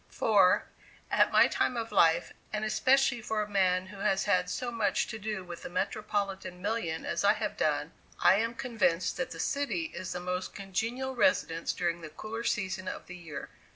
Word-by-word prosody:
For, 195 -4 +4 0.5
at - - +4
my - - +7
time 250 - 0
of 230 -1 -3
life, 170 -4 +3 0.2
and 215 0 -2
especially 260 +3 +3
for 215 -1 -1
a - - -7
man 185 -3 +2
who 195 +1 -11
has 195 -1 +1
had 180 -3 +2
so 245 +4 -3
much 225 -3 +1
to 220 -2 -5
do 210 -2 -3
with 175 -1 -9
the - - -7
metropolitan 195 -1 -2
million 185 -5 -2
as - - -1
I - - +6
have - - -3
done, - - 0 0.3
I 190 - +5
am 230 +2 -1
convinced 185 -9 0
that 260 -1 -2
the - - -8
city 300 +3 -1
is 185 +1 -5
the - - -3
most 180 +1 -3
congenial 225 +7 -3
residence 170 -11 +2
during 170 -1 -2
the 155 - -7
cooler 220 +8 -6
season 190 -5 -1
of - - -5
the 180 - -9
year. 165 -4 -8
200 Hz, 190 wpm, -30 LUFS, 180-230 Hz, 0.5 s, my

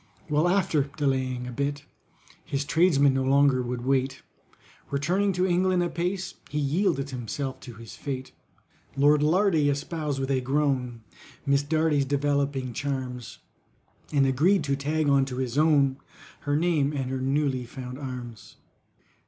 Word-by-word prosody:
Well, 150 +3 +3
after 165 -7 +1
delaying 130 -3 0
a 125 - -6
space, 140 +2 -2 0.6
His 140 0 -3
tradesmen 145 -4 +4
no 135 0 0
longer 135 -1 +4
would 125 0 -4
wait: 135 0 0 0.7
Returning 180 +9 +1
to 180 +1 +1
England 180 0 +2
apace, 175 +2 -2 0.2
He 150 - -4
yielded 145 -1 0
himself 130 +2 -4
to 120 - -10
his 115 0 -11
fate. 130 -3 -5 0.7
LORD 145 +1 +4
LARDY 160 -1 +3
espoused, 145 0 -2
with 135 0 -2
a 130 -1 +1
groan, 130 -3 -1 0.4
MISS 140 -1 +3
DARDY'S 155 -1 +1
developing 140 -2 0
charms, 130 -3 -4 0.7
And 140 -2 +3
agreed 155 +10 +3
to 140 -1 0
tag 150 +2 -1
on 140 -1 +4
to 130 -2 -6
his 130 -2 -2
own, 145 -3 +3 0.4
Her 145 0 -1
name 155 -3 +1
and 135 -3 -3
her 130 -1 -2
newly 135 -2 0
found 125 +1 -8
arms. 125 -6 -8
140 Hz, 145 wpm, -26 LUFS, 130-150 Hz, 0.7 s, tradesmen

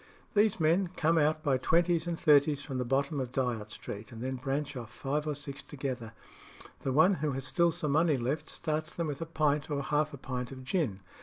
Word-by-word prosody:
"These 210 -2 +3
men 170 +4 +3
come 165 +1 +3
out 155 +1 +2
by 135 -4 +2
twenties 170 +3 +2
and 170 -1 -2
thirties 145 -1 +4
from 135 -3 -4
the - - +1
bottom 140 +4 0
of 125 -2 -3
Dyot 120 -5 -1
Street, 105 0 -7
and 115 - -9
then 130 +2 -2
branch 140 +3 -2
off 115 -4 -7
five 145 +6 -2
or 150 - -1
six 140 -1 -7
together. 130 -5 -5 0.7
The 135 - -2
one 160 +9 +5
who 150 -2 0
has 135 0 -4
still 170 +2 +3
some 160 -3 -1
money 155 0 +3
left 130 +5 -2
starts 155 0 -2
them 170 - -1
with 145 0 -4
a 165 - -3
pint 150 -2 +1
or 140 -1 -1
half 150 +1 +1
a 140 - -8
pint 125 -1 -4
of 130 -1 -8
gin. 130 - -1
145 Hz, 220 wpm, -31 LUFS, 130-155 Hz, 0.7 s, one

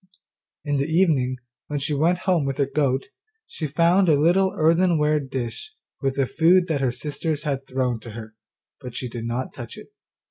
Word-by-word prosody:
In 145 -1 0
the 140 +1 0
evening, 150 -8 +2 0.3
when 150 - -3
she 140 +2 -1
went 165 +5 +2
home 180 -5 +3
with 135 -1 -2
her 140 - +2
goat, 135 +3 0 0.4
she 155 - -4
found 170 +5 +3
a 145 -2 +4
little 185 +5 +3
earthenware 160 -2 +3
dish 135 - -5 0.3
with 135 -1 0
the 135 - +2
food 175 +6 +4
that 145 -4 0
her 130 -2 +1
sisters 150 +3 -3
had 135 -3 -3
thrown 125 -3 -1
to 110 0 -10
her, 110 -1 -9 0.5
but 125 -3 -9
she 125 - -3
did 115 -1 -6
not 120 +2 -3
touch 120 -2 -8
it. - - -13
145 Hz, 185 wpm, -23 LUFS, 130-165 Hz, 0.5 s, a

